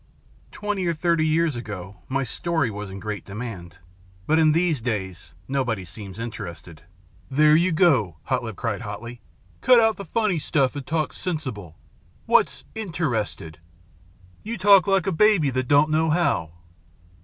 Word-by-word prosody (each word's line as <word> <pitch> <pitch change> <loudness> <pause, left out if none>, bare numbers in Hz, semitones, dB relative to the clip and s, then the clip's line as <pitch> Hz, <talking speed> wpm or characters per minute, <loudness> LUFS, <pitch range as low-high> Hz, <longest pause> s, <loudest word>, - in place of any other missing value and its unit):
"Twenty 205 -3 -2
or 170 - 0
thirty 165 0 +1
years 160 -2 +1
ago 100 -5 -7
my 135 +1 0
story 160 +1 -1
was 105 0 -6
in 95 +1 -8
great 105 +2 -5
demand. 100 -5 -7 0.5
But 160 +1 +3
in 155 -1 +5
these 165 -4 +1
days 95 -7 -4
nobody 125 -8 -1
seems 100 +2 -10
interested 85 -8 -7 0.3
" - - -30
"There 150 +2 +5
you 175 +3 +3
go!" 135 - +3
Hare - - 0
Lip - - -7
cried - - -3
hotly. 120 +1 -7 0.4
"Cut 250 -2 +6
out 225 -1 +3
the 200 - -7
funny 205 -1 0
stuff 140 -3 0
and 140 -2 -6
talk 155 -1 -1
sensible. 125 - -5 0.5
What's - - +2
interested? 135 - -3 0.8
You 230 +2 -5
talk 195 -2 +6
like 195 -3 +2
a 195 - 0
baby 180 -5 +3
that 130 0 -2
don't 145 +3 +4
know 160 +1 +2
how." 150 - +1
140 Hz, 155 wpm, -24 LUFS, 105-170 Hz, 0.8 s, Cut